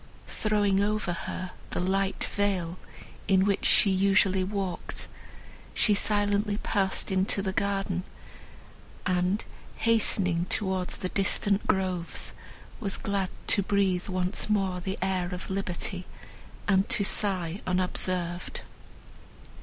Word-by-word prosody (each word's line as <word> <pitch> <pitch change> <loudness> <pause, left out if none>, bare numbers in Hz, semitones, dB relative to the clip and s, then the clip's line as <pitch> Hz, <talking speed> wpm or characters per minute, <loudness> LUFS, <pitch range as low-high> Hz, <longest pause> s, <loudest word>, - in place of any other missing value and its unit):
Throwing 205 -2 +2
over 210 -3 0
her 180 +1 -5 0.2
the - - -3
light 190 +2 0
veil, 185 -4 0 0.5
in 190 -1 +4
which 200 -1 +1
she 200 - +6
usually 190 0 +3
walked, 190 -2 -3 0.7
she 210 - +4
silently 205 0 +1
passed 195 -2 0
into 190 +1 +1
the 190 -1 -1
garden, 195 -2 0 1.0
and, 180 +2 +1 0.3
hastening 190 -6 +2
towards 190 -3 -1
the 185 - -3
distant 200 +1 +1
groves, 185 -3 -1 0.5
was 200 -3 -3
glad 195 -2 -1 0.2
to 200 - +4
breathe 195 -2 +1
once 185 +2 -2
more 195 -3 +1
the 190 +2 -3
air 185 -2 0
of 180 - -7
liberty, 185 -1 -3 0.6
and 195 0 +3
to 200 - +2
sigh 190 -3 0
unobserved. 180 -1 -1
190 Hz, 115 wpm, -28 LUFS, 185-200 Hz, 1.0 s, she